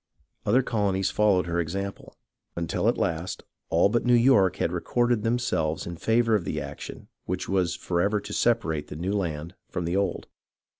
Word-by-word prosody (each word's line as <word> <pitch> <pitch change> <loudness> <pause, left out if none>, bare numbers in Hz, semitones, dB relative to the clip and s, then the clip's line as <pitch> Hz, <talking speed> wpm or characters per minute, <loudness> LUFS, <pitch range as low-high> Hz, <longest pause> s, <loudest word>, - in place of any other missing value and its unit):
Other 130 +2 +4
colonies 100 -5 0
followed 100 -4 +3
her 85 0 -1
example, 100 +4 -4 0.4
until 85 -1 0
at - - 0
last 80 +3 -2 0.3
all 85 +4 +4
but 120 +4 +1
New 125 0 +4
York 115 -7 +5
had - - -1
recorded 120 -2 +1
themselves 115 -10 0
in 85 - -5
favour 115 +5 +2
of 105 -5 +2
the - - -3
action - - -8 0.2
which 90 0 -3
was 90 -2 +1
forever 100 +4 0
to - - -8
separate 85 -11 +1
the - - -8
new 90 +6 -2
land 85 -4 -2 0.2
from 90 - -3
the 85 +2 -1
old. 100 -3 0
95 Hz, 170 wpm, -26 LUFS, 85-110 Hz, 0.4 s, York